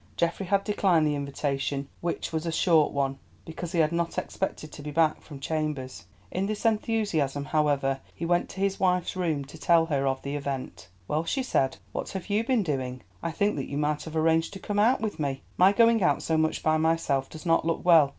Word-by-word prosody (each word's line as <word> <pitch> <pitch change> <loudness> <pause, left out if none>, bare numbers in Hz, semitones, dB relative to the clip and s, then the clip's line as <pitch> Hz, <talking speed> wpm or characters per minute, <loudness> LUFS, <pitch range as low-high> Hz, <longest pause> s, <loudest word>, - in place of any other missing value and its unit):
Geoffrey 170 +3 0
had 200 +1 +2
declined 190 -6 +2
the 150 - +1
invitation, 140 -1 -2
which 170 -1 -3
was 160 +1 -2
a - - 0
short 160 -2 +3
one, 135 -1 -1 0.3
because 165 +1 -6
he 180 - -2
had 155 -1 +3
not 170 0 -1
expected 155 -5 -3
to - - -9
be 150 - -6
back 155 +1 +2
from 145 -3 -10
chambers. 150 - -3 0.3
In 190 +2 -1
his 215 +1 -4
enthusiasm, 205 -11 +1
however, 145 -3 +1 0.2
he 170 - -4
went 175 +1 +1
to 190 - -9
his 195 0 0
wife's 180 -1 +1
room 160 -6 -1
to 155 +3 -12
tell 165 0 +4
her 140 -4 0
of 135 0 -1
the 140 +1 -3
event. 140 -8 -5 0.2
"Well," 155 +2 0
she 265 +10 -1
said, 135 - +1
"what - - -4
have 190 +2 -5
you 210 +2 +2
been 245 -3 +2
doing? 130 -6 -3 0.2
I 170 - -2
think 205 +4 0
that 135 - -4
you 140 - -3
might 150 0 0
have 160 -1 -7
arranged 160 +2 +2
to 195 - -7
come 205 +1 -2
out 230 +4 +4
with 215 -5 -3
me. 140 -3 -2
My 185 +2 +6
going 230 +1 +4
out 180 - +2
so 160 - 0
much 160 0 +1
by 155 0 +3
myself 155 -4 +1
does 160 +3 -10
not 165 -1 +3
look 165 +1 -1
well. 165 -5 +7
160 Hz, 220 wpm, -27 LUFS, 145-185 Hz, 0.3 s, well